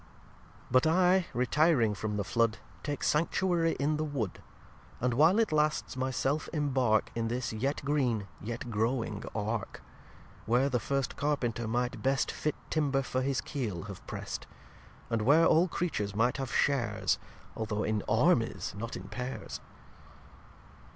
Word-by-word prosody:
lxi - - -24
But 130 +4 +5
I, 180 +2 +4
retiring 125 -2 +3
from 105 +1 -3
the 100 - 0
Flood, 115 +3 +1 0.2
Take 145 -1 -4
Sanctuary 165 +1 +2
in 150 +2 +1
the 155 - -1
Wood; 135 -11 -3 0.6
And, 125 0 +1
while 160 - +5
it 225 -5 +2
lasts, 150 -3 +1
my 130 0 -1
self 135 +3 -1
imbark 130 -8 +2
In 115 -1 -1
this 120 0 -2
yet 135 +6 -2
green, 125 -8 +1
yet 120 +3 -5
growing 110 -1 -1
Ark; 105 -1 -3 0.6
Where 125 +4 +3
the 125 -2 +1
first 135 +1 -1
Carpenter 120 -6 -1
might 120 +2 -1
best 135 0 +1
Fit 150 - -2 0.2
Timber 140 -3 +1
for 130 0 -1
his 130 -1 0
Keel 110 - -4
have - - -9
Prest. - - -5 0.6
And 115 -1 +1
where 145 +9 +5
all 165 +3 +5
Creatures 105 - -2
might 120 +4 +2
have 135 -3 -4
shares, 140 -4 +1 0.4
Although 110 -1 -2
in 110 -1 0
Armies, - - +2
not 115 +3 -5
in - - -6
Paires. 125 +1 -5
130 Hz, 150 wpm, -30 LUFS, 115-150 Hz, 0.6 s, But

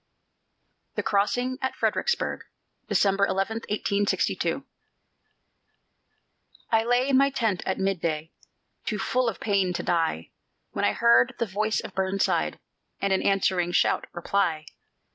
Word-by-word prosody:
THE - - -1
CROSSING 245 +6 0
AT 260 - -2
FREDERICKSBURG 480 - 0 0.5
[December 200 0 +3
11, 195 +4 -1
1862] 205 -1 0 2.1
I 225 -1 +4
lay 245 +3 +2
in 265 - +4
my 275 +1 +5
tent 225 -8 -1
at 190 - 0
mid 195 -2 -1
day, 160 -1 -2 0.5
Too 215 - -2
full 250 +4 +1
of 210 - -7
pain 195 -4 +1
to - - -3
die, 165 - 0 0.4
When - - -1
I - - +2
heard 120 +1 +4
the 235 - 0
voice 215 +2 -1
of - - -9
Burnside, 190 +1 0 0.4
And 195 -1 +1
an 190 - +2
answering 185 -3 +1
shout - - +2
reply. 170 -3 -1
195 Hz, 130 wpm, -26 LUFS, 180-225 Hz, 2.1 s, my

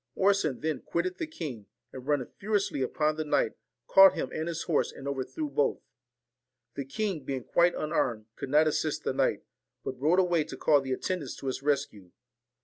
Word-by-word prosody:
Orson 195 -8 +2
then 155 -2 -1
quitted 180 +2 -2
the 325 - -2
king, 140 - -7 0.3
and, 130 0 -9
running 145 -4 0
furiously 200 -8 0
upon 150 +4 0
the 155 - -1
knight, 145 -6 +1 0.3
caught 195 0 +8
him - - -3
and 160 +1 -3
his 170 -1 -3
horse 165 - +1
and 135 - -9
overthrew 140 - -3
both. 145 - +1 1.0
The 140 +1 -4
king, 175 +2 -2
being 130 -1 -3
quite 175 +6 +3
unarmed, 125 -8 -1
could - - -6
not 150 +3 +5
assist 155 0 -1
the - - -1
knight, - - +1 0.4
but 130 - -5
rode 160 +5 +4
away 175 -4 +3
to 160 - -8
call 145 -2 +4
the 135 -1 -5
attendants 155 -1 -3
to - - -8
his 130 0 -2
rescue. 140 -10 -1
150 Hz, 185 wpm, -29 LUFS, 135-175 Hz, 1.0 s, caught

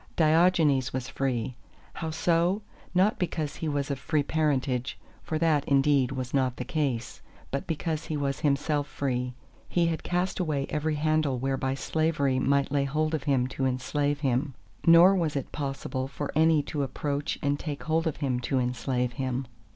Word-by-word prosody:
Diogenes 155 -5 +3
was 130 -1 -3
free. 130 -3 -1 0.4
How 160 - -4
so? 170 +5 +1 0.3
Not 190 +4 +3
because 160 -5 -2
he 160 - -3
was 145 -1 -1
of 135 - -3
free 145 +3 0
parentage 135 -5 0 0.2
(for 155 - -3
that, 155 -3 +2
indeed, 140 -2 +3
was 130 -2 -4
not 130 -3 +1
the 125 - -4
case), 135 -7 -2 0.3
but 140 - -3
because 160 0 -2
he 155 - -3
was 140 -1 -1
himself 145 0 +1
free. 125 -3 -2 0.3
He 175 -1 +2
had 165 -1 -1
cast 180 +2 -1
away 150 -6 0
every 155 +1 0
handle 155 -3 +1
whereby 135 +1 -1
slavery 140 -3 0
might 140 +1 +2
lay 140 -1 +2
hold 155 +3 0
of 145 -4 -2
him 135 -3 +2
to 135 0 -1
enslave 145 +3 -1
him, 135 0 0 0.3
nor 170 +3 +8
was 165 -6 0
it 135 - -3
possible 135 -2 -3
for 140 +1 -5
any 160 -1 +4
to 145 - -3
approach 140 +2 -2
and 145 0 +1
take 145 -3 -5
hold 160 +1 +1
of 160 - -2
him 130 -4 -1
to 130 +2 -1
enslave 125 0 0
him. 130 0 -2
145 Hz, 175 wpm, -28 LUFS, 135-155 Hz, 0.4 s, nor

